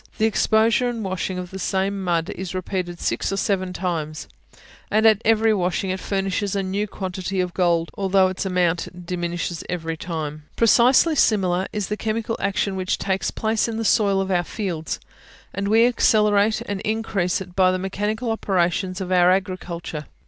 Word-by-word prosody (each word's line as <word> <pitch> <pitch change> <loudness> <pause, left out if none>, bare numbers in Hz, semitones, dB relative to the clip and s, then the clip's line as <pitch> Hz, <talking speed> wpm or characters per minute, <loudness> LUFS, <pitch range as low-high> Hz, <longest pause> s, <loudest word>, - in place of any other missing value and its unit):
The 220 - +2
exposure 225 +2 +3
and 230 -2 -4
washing 185 -1 -3
of 180 -1 -6
the 190 - -6
same 195 +1 -1
mud 170 -2 0
is 185 0 -6
repeated 180 -1 -3
six - - -1
or 195 - -1
seven 185 -2 0
times, 165 -4 -3 0.6
and 215 +1 +2
at 220 -1 +5
every 220 0 +4
washing 185 0 -1
it 190 - -3
furnishes 195 +1 -1
a 195 - 0
new 200 +3 -2
quantity 190 -1 -4
of 180 -1 -1
gold, 170 -2 +1
although 195 -1 +3
its 185 0 -3
amount 180 -1 -1
diminishes 175 -1 -3
every 165 -2 -3
time. 155 -3 -5
Precisely 250 +7 +5
similar 190 -9 +2
is 210 -2 -2
the 210 - -3
chemical 225 +1 -2
action 200 0 -1
which 185 -1 -1
takes 190 -1 -1
place 220 +1 0
in 225 -1 -3
the 225 - -2
soil 200 -3 +3
of 195 0 -1
our 175 -1 +2
fields; 175 -5 -4 0.5
and 200 +1 -2
we 225 +3 +5
accelerate 215 -3 +3
and 200 -1 -4
increase 210 -5 -1
it 180 -2 -9
by 185 -1 +4
the 185 - 0
mechanical 210 +5 -2
operations 185 -2 0
of 185 -1 -4
our 180 -1 +5
agriculture. 180 -4 -2
190 Hz, 175 wpm, -22 LUFS, 180-210 Hz, 0.6 s, at